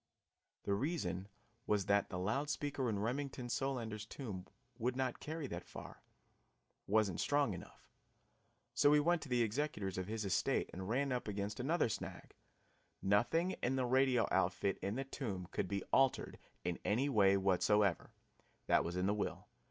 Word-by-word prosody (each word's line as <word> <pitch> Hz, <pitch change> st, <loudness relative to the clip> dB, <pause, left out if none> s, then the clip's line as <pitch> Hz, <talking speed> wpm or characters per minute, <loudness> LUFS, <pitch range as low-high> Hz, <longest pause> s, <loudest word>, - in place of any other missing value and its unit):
The 100 Hz, -, 0 dB
reason 100 Hz, -, -1 dB, 0.4 s
was 105 Hz, -3 st, +2 dB
that 100 Hz, 0 st, +2 dB
the 90 Hz, -, -4 dB
loud 110 Hz, +11 st, 0 dB
speaker 140 Hz, -4 st, -1 dB
in 105 Hz, -, 0 dB
Remington 125 Hz, +3 st, -2 dB
Solander's 120 Hz, -4 st, -2 dB
tomb 100 Hz, -10 st, -6 dB, 0.3 s
would 125 Hz, +2 st, 0 dB
not 130 Hz, -2 st, -1 dB
carry 155 Hz, 0 st, -4 dB
that 85 Hz, -8 st, -5 dB
far; -, -, -10 dB, 0.9 s
it -, -, -9 dB
was 110 Hz, 0 st, +5 dB
not 95 Hz, -, -4 dB
strong 145 Hz, -6 st, +2 dB
enough. 85 Hz, -, -11 dB, 0.9 s
So 145 Hz, -, +5 dB
we 150 Hz, 0 st, +6 dB
went 170 Hz, +2 st, +2 dB
to -, -, -8 dB
the 120 Hz, -1 st, +3 dB
executors 105 Hz, -6 st, -2 dB
of 95 Hz, -, -3 dB
his 110 Hz, 0 st, -3 dB
estate 95 Hz, -, +1 dB
and 95 Hz, +2 st, -5 dB
ran 135 Hz, +4 st, +1 dB
up 125 Hz, -2 st, -1 dB
against 100 Hz, 0 st, -3 dB
another 155 Hz, +5 st, +2 dB
snag 110 Hz, -, -6 dB, 0.7 s
nothing 120 Hz, -, +3 dB
in 130 Hz, +2 st, +1 dB
the 130 Hz, -1 st, +1 dB
radio 130 Hz, -1 st, +3 dB
outfit 95 Hz, +1 st, +1 dB
in 100 Hz, +2 st, -2 dB
the 135 Hz, -, -1 dB
tomb 105 Hz, -, -4 dB
could 95 Hz, -, -1 dB
be 100 Hz, +1 st, -2 dB
altered 135 Hz, -1 st, +3 dB, 0.2 s
in 90 Hz, -1 st, -2 dB
any 120 Hz, +7 st, +2 dB
way 100 Hz, -7 st, +5 dB
whatever. 95 Hz, 0 st, +2 dB, 0.6 s
That -, -, +4 dB
was 85 Hz, +1 st, -3 dB
in 90 Hz, +1 st, 0 dB
the 100 Hz, -, +3 dB
will. 105 Hz, -, -3 dB
110 Hz, 170 wpm, -37 LUFS, 100-135 Hz, 0.9 s, we